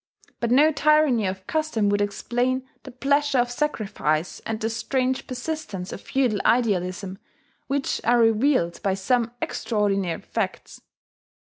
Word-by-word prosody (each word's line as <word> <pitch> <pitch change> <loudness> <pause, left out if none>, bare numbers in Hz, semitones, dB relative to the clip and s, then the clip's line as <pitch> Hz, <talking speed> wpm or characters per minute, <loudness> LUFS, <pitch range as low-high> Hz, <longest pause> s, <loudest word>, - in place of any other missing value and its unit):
But 235 - -1
no 290 +6 +5
tyranny 295 -7 +3
of 190 0 -5
custom 310 -10 0
would 205 0 +1
explain 245 +6 -1
the - - -10
pleasure 280 +2 +1
of 245 0 +2
sacrifice 195 - -1
and 220 -1 -2
the 220 - -1
strange 255 +3 -1
persistence 250 - -5
of - - -7
feudal 250 -6 0
idealism 195 -4 0 0.5
which 275 0 -1
are 240 +1 +4
revealed 225 -5 +2
by 195 -1 +1
some 230 +4 +1
extraordinary 200 -6 -1
facts. - - -4
235 Hz, 130 wpm, -24 LUFS, 200-265 Hz, 0.5 s, no